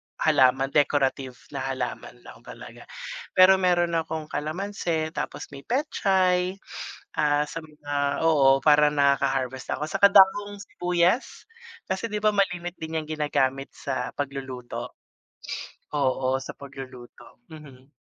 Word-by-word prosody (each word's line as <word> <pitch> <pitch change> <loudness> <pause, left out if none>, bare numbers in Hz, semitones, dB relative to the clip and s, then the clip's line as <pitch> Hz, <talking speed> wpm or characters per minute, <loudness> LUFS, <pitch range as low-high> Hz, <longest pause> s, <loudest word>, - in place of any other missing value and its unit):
halaman, 135 -2 +3
decorative 135 -3 +1 0.2
na 140 - -4
halaman 125 -3 -4
lang - - -13
talaga. - - -11 0.5
Pero 190 +1 +7
meron 175 -2 +2
akong 160 -1 -5
kalamansi, 160 -1 -2
tapos - - -5
may 140 -1 -11
pechay, 190 -8 +1 0.6
ah, 145 0 +3
sa 165 +2 -6
mga 145 -1 -3
oo, 140 -4 +5
para 150 -1 +6
nakaka-harvest 135 -3 0
ako. 150 - -3
Saka 200 +2 +5
dahong 205 +1 +5
sibuyas, 180 +2 -1 0.4
kasi, 190 +5 -3
di 210 - -4
ba, 210 0 +2
malimit 180 -3 0
din 160 0 -4
yang 155 - -2
ginagamit 140 -3 -1
sa 125 - -3
pagluluto? 135 -3 -6 1.0
Oo, 130 -1 +1
sa 135 - -7
pagluluto, 130 -4 -12
mhm. 140 -4 -13
150 Hz, 120 wpm, -25 LUFS, 135-180 Hz, 1.0 s, Pero